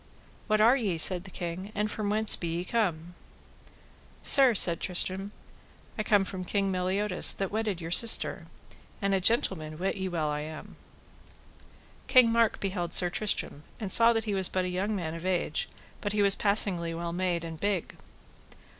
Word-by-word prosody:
What 215 -1 +1
are 230 +4 +5
ye, 205 -10 -2
said 180 +2 +3
the - - -10
king, 180 +3 -7
and 210 +1 -2
from 210 -2 -4
whence 215 +1 +3
be 170 - -6
ye 170 +2 -4
come? 175 -7 -2 1.1
Sir, 265 -5 +6
said 170 -4 +5
Tristram, 190 +2 -2 0.6
I - - -3
come 205 -2 +1
from 185 -1 -6
King 195 +1 -2
Meliodas 185 +1 +2
that 195 -1 -5
wedded 215 -4 -3
your 165 -1 -8
sister, 225 +5 +4 0.5
and 200 0 -1
a 190 - 0
gentleman 175 -7 -1
wit 190 +4 -3
ye 190 0 -4
well 165 -3 -3
I 150 0 -3
am. 155 +1 -9 1.3
King 250 -3 +5
Mark 230 -1 +1
beheld 180 -3 -4
Sir 175 -1 +4
Tristram 200 -7 -2 0.2
and 200 -4 -5
saw 230 +3 +6
that 225 -1 -2
he 210 - -3
was 190 -2 +1
but 185 -1 -2
a - - -3
young 195 +4 -3
man 165 -5 -5
of 165 0 -9
age, 185 -1 -2 0.3
but 205 -1 -3
he 210 -1 +1
was 200 -1 +5
passingly 185 -5 0
well 170 0 -5
made 175 -1 -2
and 165 -1 -8
big. 200 -3 -3
190 Hz, 180 wpm, -27 LUFS, 175-210 Hz, 1.3 s, Sir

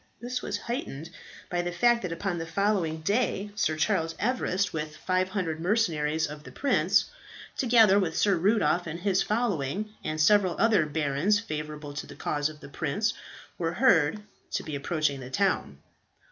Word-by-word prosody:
This 250 +1 -4
was 205 - -3
heightened 175 - -5 0.4
by 175 0 -1
the 175 0 -3
fact 240 +6 +3
that 180 - -4
upon 175 +1 -2
the 165 - -4
following 170 -3 0
day 205 +1 0
Sir 180 -6 0
Charles 165 -3 0
Everest, 205 -5 0
with 155 -1 -4
500 185 -3 -1
mercenaries 160 -6 +1
of 150 0 -8
the - - -11
prince, 280 - +2 0.4
together 225 -6 +5
with 170 -5 -1
Sir 200 -2 +3
Rudolph 175 -3 +2
and 165 +2 -5
his 190 -1 +2
following, 210 - -1
and 155 0 -3
several 185 +2 +4
other 210 -9 +3
barons 150 +7 +1
favourable 150 -6 -6
to 145 - -6
the - - -11
cause 145 0 -1
of 155 -1 -13
the - - -9
prince, 175 +10 -1 0.5
were 165 -1 -1
heard 185 - +3 0.3
to - - -1
be 155 - -5
approaching 145 -1 -1
the 130 -1 -8
town. 195 +7 0
175 Hz, 165 wpm, -28 LUFS, 155-210 Hz, 0.5 s, together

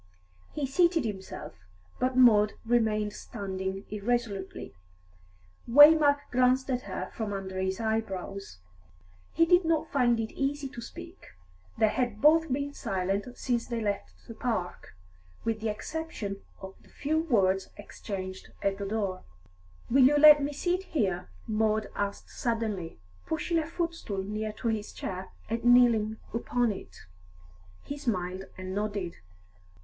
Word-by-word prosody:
He 295 - -2
seated 335 +2 +2
himself, 195 -3 -6 0.5
but 255 0 0
Maud 215 -5 +6
remained 215 -3 +1
standing 190 -3 -5
irresolutely. 210 -2 -2 1.0
Waymark 290 +2 +8
glanced 255 +2 +3
at 250 -1 0
her - - -4
from 220 -3 -3
under 190 -1 -4
his 190 0 -1
eyebrows. 200 - -3 0.8
He 330 - +5
did 355 +2 +5
not 325 -1 0
find 240 -4 +3
it 220 -1 -3
easy 280 +1 -1
to 240 - -8
speak; - - -10 0.5
they 220 - +4
had 240 -3 -1
both 315 +2 +5
been 285 +2 -1
silent 195 -2 -2
since 240 -2 -1
they 235 -2 -2
left 205 -2 -3
the 230 - -7
park, 220 - -3 0.5
with 225 -1 0
the 225 - -1
exception 210 -4 -5 0.2
of 190 0 -7
the - - -22
few 310 +2 -1
words 195 - +2
exchanged 190 -2 -7
at 195 0 0
the 200 - -3
door. 200 -3 -2 0.7
"Will 260 +2 +5
you 295 +2 +3
let 300 0 +9
me 285 +1 -1
sit 355 +6 -1
here?" 200 - -1 0.2
Maud 215 -1 0
asked 200 0 -4
suddenly, 220 -8 -2 0.3
pushing 325 +1 0
a 310 - -3
footstool 330 - -3
near 215 +2 -3
to 230 +2 -2
his 215 -2 -3
chair, 185 0 -5 0.2
and 230 +2 -3
kneeling 235 -3 +5 0.2
upon 235 0 +1
it. 195 - -9 0.8
He 285 +1 -6
smiled 190 -7 -2
and 185 0 -6
nodded. 200 -3 -3
225 Hz, 140 wpm, -29 LUFS, 200-275 Hz, 1.0 s, let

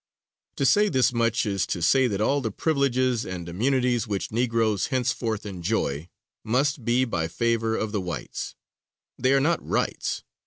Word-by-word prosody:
To 140 - 0
say 210 +9 +4
this 130 -5 +2
much 115 -1 +1
is 100 -3 -1
to - - -2
say 130 +10 +4
that 100 -4 -2
all 140 +7 +2
the 115 - -1
privileges 130 -2 +1
and 90 -2 -6
immunities 125 +5 +1
which 100 -2 -3
Negroes 115 -3 +1
henceforth 120 -5 -1
enjoy, 90 -5 -2 0.3
must 135 +3 0
be 120 +3 +2
by 85 -9 -1
favor 115 +4 0
of 110 - -2
the 105 -2 -1
whites; 90 -2 -5 0.6
they 130 +1 +2
are 135 - +5
not 165 +4 +1
rights. - - -1
115 Hz, 160 wpm, -25 LUFS, 105-130 Hz, 0.6 s, are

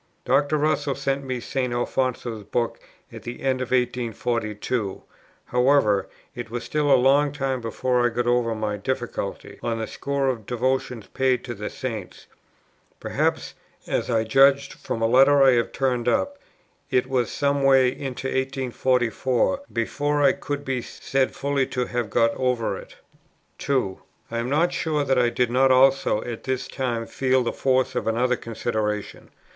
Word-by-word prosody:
Dr. 145 +2 +2
Russell 150 -2 0
sent 140 0 -1
me 130 -2 -3
St. 125 +1 -2
Alfonso's 120 -2 -2
book 115 +3 -2 0.3
at - - -8
the 120 +2 -8
end 130 -1 +1
of 130 - -3
1842; 120 -3 -1 0.4
however, 125 -7 +2 0.2
it 120 -2 -7
was 120 +1 -4
still 150 -1 0
a 135 - +7
long 140 +3 +4
time 135 -3 -2
before 125 +2 0
I 120 - +3
got 120 +1 -2
over 120 -2 +1
my 105 -1 -2
difficulty, 120 -2 -4
on 115 -1 -2
the 110 - -2
score 140 +3 -2
of 125 -3 -1
the - - -19
devotions 125 -2 -1
paid 130 -2 +1
to 120 - -5
the 105 -1 -5
Saints; 110 -7 -6 0.7
perhaps, - - -1 0.3
as - - -2
I 115 -2 +2
judge 135 +4 +4
from 115 - -4
a - - +4
letter 135 +4 +6
I 135 - +7
have 120 -2 +1
turned 125 -3 -1
up, 285 - 0 0.5
it 130 -2 +2
was 125 -3 0
some 140 0 0
way 135 -2 +5
into 130 0 -5
1844 130 - 0
before 145 +5 0
I - - +6
could 145 0 -5
be 130 -2 -1
said 135 +2 -2
fully 140 -1 0
to 125 -1 -2
have 120 -3 -3
got 115 +2 +2
over 125 -3 0
it. - - -11 0.6
2. 125 -9 -1 0.3
I 115 - -2
am 120 +2 -2
not 165 +5 +2
sure 155 -2 0
that 135 -2 +2
I 120 -1 +3
did 120 0 0
not 130 +2 +4
also 130 -4 +4
at 120 -2 -7
this 130 -1 -2
time 120 -4 -2
feel 130 +1 +1
the 120 - -2
force 130 -1 +1
of - - -2
another 125 +3 +2
consideration. 110 -3 -3
125 Hz, 165 wpm, -24 LUFS, 115-135 Hz, 0.7 s, a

